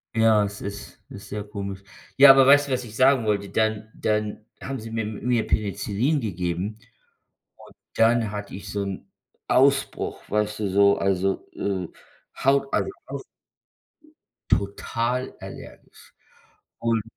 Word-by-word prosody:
Ja, 110 Hz, -2 st, +4 dB
es 100 Hz, 0 st, -7 dB
ist 100 Hz, 0 st, -7 dB
ist 100 Hz, 0 st, -10 dB
sehr 105 Hz, 0 st, -4 dB
komisch. 100 Hz, -2 st, -6 dB, 0.3 s
Ja, 140 Hz, 0 st, +10 dB
aber 135 Hz, -1 st, +6 dB
weißt 145 Hz, 0 st, +6 dB
du, -, -, -4 dB
was 125 Hz, -1 st, -1 dB
ich 110 Hz, -1 st, -11 dB
sagen 130 Hz, -1 st, +4 dB
wollte, 100 Hz, -2 st, 0 dB
dann 110 Hz, 0 st, -1 dB
dann 105 Hz, 0 st, -2 dB, 0.2 s
haben 135 Hz, -1 st, -4 dB
sie 110 Hz, +1 st, -8 dB
mir 115 Hz, 0 st, -2 dB
mir 115 Hz, +2 st, -1 dB
Penicillin 110 Hz, +7 st, 0 dB
gegeben. 95 Hz, 0 st, -3 dB, 0.8 s
Und -, -, -16 dB, 0.2 s
dann 115 Hz, -1 st, +3 dB
hatte 105 Hz, -1 st, -6 dB
ich 100 Hz, -, -9 dB
so 100 Hz, -1 st, -2 dB
'n 100 Hz, -1 st, -6 dB, 0.4 s
Ausbruch, 135 Hz, +1 st, +2 dB
weißt 105 Hz, 0 st, -1 dB
du 105 Hz, -, -1 dB
so 100 Hz, +1 st, +4 dB
also, 95 Hz, 0 st, 0 dB
äh, 95 Hz, -4 st, -2 dB, 0.6 s
Haut, 140 Hz, +1 st, +3 dB
also -, -, +1 dB, 0.2 s
aus -, -, -6 dB, 1.3 s
Total 115 Hz, +5 st, -1 dB
allergisch. -, -, -12 dB, 0.7 s
Und 115 Hz, -2 st, 0 dB
110 Hz, 140 wpm, -24 LUFS, 100-120 Hz, 1.3 s, Ja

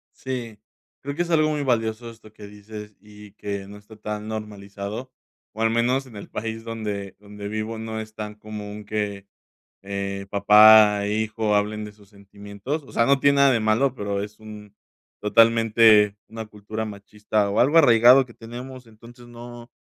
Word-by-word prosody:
Sí, 120 Hz, -5 st, -6 dB, 0.4 s
creo 140 Hz, +1 st, -5 dB
que 175 Hz, -, 0 dB
es 175 Hz, -, -8 dB
algo 155 Hz, -1 st, +3 dB
muy 150 Hz, -1 st, -2 dB
valioso 115 Hz, -2 st, -1 dB
esto 110 Hz, -2 st, -15 dB
que 105 Hz, -1 st, -13 dB
dices 105 Hz, 0 st, -11 dB
y 105 Hz, -1 st, -15 dB
que 100 Hz, -1 st, -6 dB
no 105 Hz, -, -11 dB
está 105 Hz, +2 st, -16 dB
tan 105 Hz, 0 st, -6 dB
normalizado, 105 Hz, +2 st, -7 dB, 0.4 s
o 110 Hz, -, -7 dB
al 115 Hz, -, +2 dB
menos 125 Hz, +4 st, +1 dB
en 120 Hz, -, -15 dB
el 100 Hz, -, -10 dB
país 110 Hz, +1 st, -5 dB
donde 105 Hz, -4 st, -5 dB
donde 105 Hz, 0 st, -9 dB
vivo, 110 Hz, +1 st, -4 dB
no 110 Hz, 0 st, -5 dB
es 110 Hz, 0 st, -8 dB
tan 105 Hz, -1 st, -7 dB
común 105 Hz, -1 st, -9 dB
que, 100 Hz, -2 st, -4 dB, 0.6 s
eh, 100 Hz, 0 st, -5 dB
papá 105 Hz, 0 st, +6 dB
e 105 Hz, -, -1 dB
hijo 110 Hz, -1 st, -1 dB
hablen 105 Hz, +1 st, -1 dB
de 105 Hz, -, -11 dB
sus 100 Hz, -1 st, -22 dB
sentimientos, 100 Hz, +7 st, -7 dB
o -, -, -15 dB
sea, 115 Hz, -, +2 dB
no 140 Hz, 0 st, +3 dB
tiene 140 Hz, 0 st, +4 dB
nada 140 Hz, -1 st, +5 dB
de 115 Hz, -, 0 dB
malo, 120 Hz, +5 st, +1 dB
pero 100 Hz, -2 st, -3 dB
es 105 Hz, +1 st, -8 dB
un 105 Hz, -1 st, -12 dB, 0.5 s
totalmente 110 Hz, -1 st, +4 dB
una 110 Hz, 0 st, -7 dB
cultura 105 Hz, +1 st, -7 dB
machista 105 Hz, 0 st, -2 dB
o 100 Hz, -, -1 dB
algo 145 Hz, +7 st, +4 dB
arraigado 125 Hz, -2 st, +6 dB
que 120 Hz, -, -16 dB
tenemos. 125 Hz, +2 st, -10 dB
Entonces, 115 Hz, +2 st, -16 dB
no 120 Hz, 0 st, -11 dB
110 Hz, 180 wpm, -23 LUFS, 105-115 Hz, 0.6 s, papá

